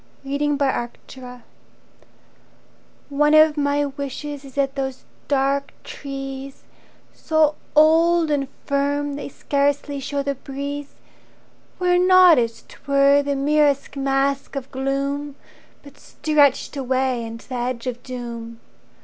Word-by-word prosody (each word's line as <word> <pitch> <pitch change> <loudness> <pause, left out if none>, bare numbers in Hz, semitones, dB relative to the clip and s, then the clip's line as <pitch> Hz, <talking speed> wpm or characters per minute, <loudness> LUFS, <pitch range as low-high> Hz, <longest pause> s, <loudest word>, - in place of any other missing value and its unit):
Reluctance 280 -3 -1 0.2
Into 260 - -11
My 250 -1 -8 1.8
Own 280 - -6
ONE 295 0 +4
of 310 -1 +6
my 290 0 +1
wishes 280 +1 -6
is 270 -2 -13
that 275 -1 0
those 265 -1 -4 0.2
dark 275 0 0
trees, 270 -1 -7 0.5
So 315 -2 +2 0.2
old 325 +1 +4
and 280 -2 0 0.2
firm 285 +1 0
they 285 - -6
scarcely 285 +1 -1
show 280 +1 -3
the 280 0 -1
breeze, 280 +1 -6 0.8
Were 360 -1 +2
not, 365 -4 +7
as 230 -1 -2
'twere, 280 0 +3
the 285 0 -2
merest 285 0 +1
mask 275 0 0
of 270 -1 -5
gloom, 275 +2 -2 0.5
But 285 0 -15
stretched 290 -2 +1
away 260 -2 0
unto 230 +2 -9
the - - -6
edge 240 0 -3
of 245 -1 -4
doom. 235 -2 -7
280 Hz, 125 wpm, -22 LUFS, 270-290 Hz, 1.8 s, not